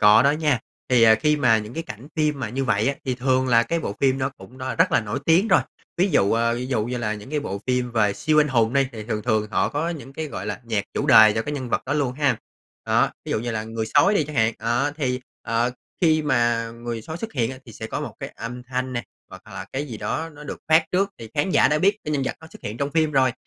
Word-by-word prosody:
có 105 +3 +7
đó 140 - +5
nha. 150 -4 +1 0.3
Thì, 125 -2 +4
ờ, 110 -1 +8
khi 150 -1 +3
mà 120 -6 +4
những 105 +2 -7
cái 165 - -3
cảnh 125 -1 -10
phim 150 -3 +1
mà 115 - -2
như 135 +4 -2
vậy 110 -1 +2
á, 140 - 0
thì 130 -2 -1
thường 130 +1 +1
là 115 -1 +5
cái 170 +6 -1
bộ 100 - -4
phim 135 -1 +3
nó 130 +1 0
cũng 130 -1 -15
đ - - -9 0.2
rất - - +4
là - - +4
nổi 110 +4 -3
tiếng 180 +7 +4
rồi. - - +5 0.4
Ví 185 +3 +3
dụ 100 -9 +3
ờ, 115 +1 +2
ví 125 +1 -4
dụ 115 -5 0
như 125 +1 -3
là 110 -2 -1
những 105 +6 -10
cái 150 -1 0
bộ 100 -7 -5
phim 125 -1 0
về 105 -3 +2
siêu 155 +7 +2
anh 150 - +2
hùng 115 -2 +2
đi, 140 -1 +3
thì 110 -2 -7
thường 105 -2 -3
thường 110 -3 +1
họ - - +1
có 150 +3 -2
những 150 -5 -6
cái, 160 +2 -4
gọi 100 -7 -6
là, 120 - -4
nhạc 110 -3 -1
chủ 140 - -1
đề 110 -5 +8
cho 110 - 0
cái 145 - -4
nhân 130 -4 -4
vật - - 0
đó 135 - -1
luôn 140 -4 0
ha. 135 -4 +1 0.5
Đó, - - +3
ví - - -6
dụ - - +1
như 120 - -3
là 110 -1 -3
Người 110 0 -4
sói 195 +8 +5
đi 155 - +2
chẳng 150 -1 -8
hạn, 110 0 +3
đó, 120 +5 0
thì, 125 -4 -1 0.2
ờ, 115 +2 0 0.3
khi 155 -3 +3
mà 120 -4 +1
Người 115 -1 -6
sói 160 +6 -6
xuất 225 +5 -6
hiện 120 -3 0 0.2
thì 115 - -11
sẽ 110 - -7
có - - -4
một - - -6
cái - - -4
âm 125 +2 -6
thanh 130 +1 -3
nè, 120 - -2 0.3
hoặc - - -11
là - - -7
cái 140 +3 -2
gì 115 -5 -6
đó 155 +10 -2
nó 150 0 -12
được - - -6
phát 160 +1 +5
trước. 195 +2 +2
Thì 115 -1 -9
khán 150 +5 +1
giả - - +5
đã 150 +1 +2
biết 200 +5 +3
cái 150 - -2
nhân 140 -2 0
vật - - -2
nó 160 - -12
xuất - - -14
hiện 105 +2 -5
trong 140 +3 -2
phim 155 -1 +2
rồi, 130 -2 +3
125 Hz, 290 wpm, -23 LUFS, 115-150 Hz, 0.5 s, ờ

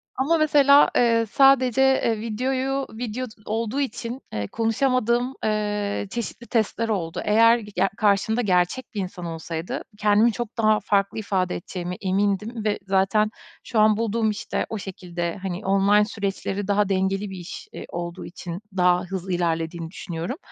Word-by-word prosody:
Ama 310 +6 +2
mesela, 290 -2 +6
eee, 230 -1 +3
sadece, 265 -2 +5
eee, 250 -5 +2
videoyu 260 +4 -1
video 240 +2 -4
d - - -14
olduğu 225 +5 -1
için, 240 0 -4
eee, 105 -1 -2
konuşamadığım, 240 +2 +1
eee, 210 -1 -1
çeşitli 235 0 -5
testler 225 0 0
oldu. 175 -5 -2
Eğer 230 +2 +5
ge 210 -2 -10
ya, 195 +2 +2
karşımda 215 +3 +2
gerçek 185 +5 +1
bir 205 - -3
insan 180 -1 -6
olsaydı, 165 0 -5
kendimi 210 +2 +4
çok 235 0 -6
daha 215 -1 +3
farklı 200 +1 0
ifade 190 -3 -1
edeceğimi 180 +1 -5
emindim 205 +4 -1
ve 210 - 0
zaten 195 +3 +2 0.3
şu 225 - -1
an 215 0 +5
bulduğum 225 0 0
işte 210 - -2
o 220 - -3
şekilde 180 -2 -5
hani, 190 +1 -4
online 200 +2 +4
süreçleri 200 -1 -3
daha 205 0 +2
dengeli 195 +1 0
bir 190 - -7
iş, 175 0 -8
iii, - - -7
olduğu 175 +1 -5
için 175 +1 -7 0.2
daha 180 0 +4
hızlı 185 0 -4
ilerlediğini 165 -1 -2
düşünüyorum. 175 - -5
210 Hz, 155 wpm, -24 LUFS, 185-230 Hz, 0.3 s, mesela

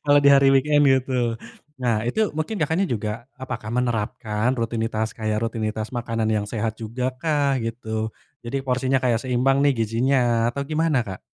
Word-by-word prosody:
Kalau 145 0 +5
di 140 - +5
hari 140 -1 +6
weekend, 145 +2 +4
gitu. 125 -3 +1 0.4
Nah, 115 -3 +1
itu 215 - +1
mungkin, 165 +6 -2
Kakaknya, 160 +5 +1
juga 115 - -3 0.2
apakah 115 -4 -5
menerapkan 115 -1 -1
rutinitas 115 -2 -2
kayak 110 -1 -1
rutinitas 110 -1 -2
makanan 115 -3 -2
yang 105 -2 +1
sehat 110 +1 -3
juga 115 +3 -3
kah? 145 -1 +1
Gitu. 110 -2 -3 0.3
Jadi 135 +4 -2
porsinya 130 0 0
kayak 120 -2 +1
seimbang 135 +2 +2
nih 145 - +5
gizinya, 120 +1 +2
atau 140 - -4
gimana, 155 -3 +2
Kak? 95 -6 -6
120 Hz, 160 wpm, -23 LUFS, 110-135 Hz, 0.4 s, hari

